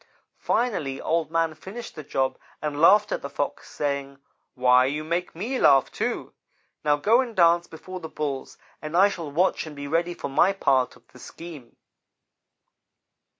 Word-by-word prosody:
Finally 165 - -1
Old 165 -1 0
man 165 -1 +1
finished 195 +9 -9
the 155 - -7
job 135 -1 -1 0.2
and 150 -1 -3
laughed 205 +4 +6
at - - -1
the 140 - -6
Fox, 140 0 -4
saying: 140 -1 -3 0.4
'Why, 125 0 +5
you 150 +3 -2
make 170 +3 -2
me 240 +9 -3
laugh, 135 -2 +5
too. - - -3 0.5
Now 150 -1 +3
go 220 - +3
and 240 -4 -6
dance 170 -1 +4
before 185 +3 -9
the 160 - -8
Bulls, 140 -3 -4 0.2
and 155 +2 -3
I 195 +2 +6
shall 170 -6 -6
watch 165 +2 +1
and 150 - -9
be 145 0 -6
ready 170 +3 0
for - - -5
my 175 +8 +3
part 135 -9 +1
of - - -22
the - - -16
scheme.' 160 -8 -11
160 Hz, 170 wpm, -25 LUFS, 140-180 Hz, 0.5 s, laughed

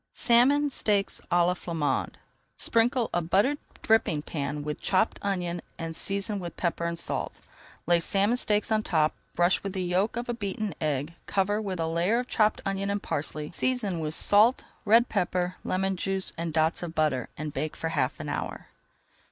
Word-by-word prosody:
SALMON 275 +5 +4
STEAKS 205 -5 +1
À 175 0 +4
LA 180 - +2
FLAMANDE 165 -4 -2 0.4
Sprinkle 235 +1 +2
a 175 - +2
buttered 205 - +2 0.2
dripping 170 -9 +2
pan 145 -1 -3
with 150 0 -4
chopped 190 +3 +1
onion, 175 -3 -2 0.2
and 165 0 -5
season 200 +2 -1
with 175 -2 -7
pepper 170 -1 -1
and 170 0 -2
salt. - - -4 0.5
Lay 175 0 +4
salmon 200 +6 +2
steaks 210 -3 0
on 215 0 +3
top, 155 -6 +1 0.2
brush 175 +2 +3
with 195 -1 -5
the 190 -2 -2
yolk 185 +6 0
of 240 - -3
a 240 - -1
beaten 205 -3 -3
egg, 150 0 -1
cover 205 +2 +1
with 190 -4 -4
a 165 - +1
layer 170 +7 +1
of 250 0 -2
chopped 215 -3 +2
onion 195 0 -1
and 200 0 -2
parsley, 150 +1 -3
season 210 -5 0
with 155 0 -1
salt, 215 +5 +5 0.2
red 230 +3 +5
pepper, 180 -2 -1
lemon 190 +1 0
juice, 190 +1 -2
and 170 0 -3
dots 160 +1 +1
of 170 -2 -6
butter, 150 -6 +1
and 155 -1 -5
bake 155 - -3
for 165 - -2
half 130 -3 -1
an 155 - -5
hour. - - -4
185 Hz, 180 wpm, -27 LUFS, 165-210 Hz, 0.5 s, salt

